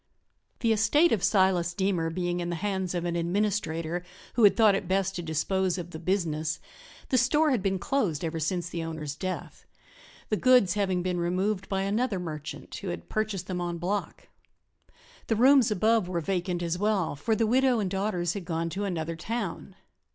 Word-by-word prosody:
The 230 -2 +3
estate 295 +10 +4
of 200 -5 +1
Silas 185 -4 +3
Deemer 185 -4 0
being 175 +1 -2
in 175 0 -3
the 170 - -2
hands 190 0 -2
of 175 0 -2
an 170 0 -1
administrator 170 -2 -1 0.3
who 235 - +2
had 200 - +5
thought 220 -3 +6
it 195 -2 -2
best 195 +1 0
to 175 - -3
dispose 180 +3 0
of 175 -1 -6
the 160 - -7
"business" 160 -4 -1 0.5
the 255 - +3
store 295 +5 +3
had 245 -6 +1
been 195 -1 0
closed 185 - -1
ever 165 0 -3
since 175 +3 -1
the 170 -1 -4
owner's 155 -3 -5
death, 185 +3 -6 0.6
the 215 - +1
goods 250 -8 +5
having 190 -3 0
been 180 -1 -1
removed 185 +3 -1
by 195 -1 0
another 210 +1 0
"merchant" 155 -3 -7
who - - -7
had 85 -1 -5
purchased 215 -4 -2
them 180 -1 -3
enbloc. 175 +3 -3 1.1
The 225 - +1
rooms 260 +1 +6
above 215 -1 +2
were 175 -2 -1
vacant 175 0 -2
as 170 +1 -2
well, 205 -6 +1
for 220 +10 0
the 225 - +2
widow 255 +2 +3
and 210 -3 0
daughters 190 -3 -1
had 200 - -5
gone 165 0 -2
to 200 +4 -2
another 165 -3 -3
town. 225 +8 -4
185 Hz, 185 wpm, -28 LUFS, 170-210 Hz, 1.1 s, thought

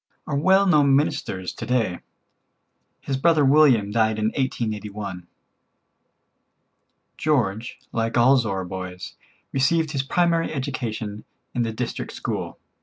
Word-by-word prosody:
are 145 - -3
well 190 +7 +4
known 145 -7 +4
ministers 95 -10 -1
to - - -8
day. 115 -8 0 1.0
His 135 - -2
brother 155 0 +3
William 135 -8 +5
died 110 0 +2
in 110 0 +1
1881. 105 -7 -3 1.9
George, 120 -7 0
like 115 +1 -1
all 125 +3 +6
Zorra 100 -7 -1
boys, 90 0 -7 0.4
received 155 +4 +1
his 140 -3 0
primary 165 +4 +1
education 115 -7 -4 0.3
in 120 - 0
the 115 -1 -1
district 115 +2 -4
school. - - -4
120 Hz, 115 wpm, -23 LUFS, 105-145 Hz, 1.9 s, all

